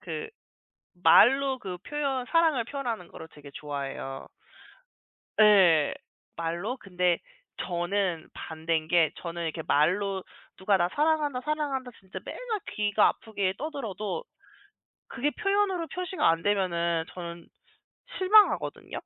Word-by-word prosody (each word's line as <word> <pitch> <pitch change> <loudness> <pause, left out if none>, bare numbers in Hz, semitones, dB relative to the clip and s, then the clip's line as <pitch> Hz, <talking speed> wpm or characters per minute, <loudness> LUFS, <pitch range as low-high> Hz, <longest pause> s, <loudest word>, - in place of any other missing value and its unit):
그 445 - -5 0.8
말로 270 +1 +6
그 185 -6 -6
표현 275 -4 -2
사랑을 325 -7 +3
표현하는 240 -9 -4
거를 160 - -11
되게 145 -1 -13
좋아해요. 140 -2 -5 1.1
네. 190 -8 +6 0.4
말로. 170 +9 -3
근데 180 -5 0 0.5
저는 175 -1 -1
반대인 160 0 -3
게 165 -2 +4
저는 170 0 -5
이렇게 160 0 -3
말로 190 +6 +2 0.3
누가 195 +1 +2
"나 175 - +2
사랑한다, 295 -3 +1
사랑한다." 290 -4 -2
진짜 190 -1 -8
맨날 455 -5 -4 0.2
귀가 210 0 +3
아프게 200 -4 -2
떠들어도 260 - -4 0.8
그게 275 +4 -1
표현으로 395 -4 0
표시가 365 0 0
안 165 0 +2
되면은 170 -5 +1
저는 170 -1 -7 0.7
실망하거든요. 410 +3 +3
205 Hz, 265 characters per minute, -28 LUFS, 170-280 Hz, 1.1 s, 말로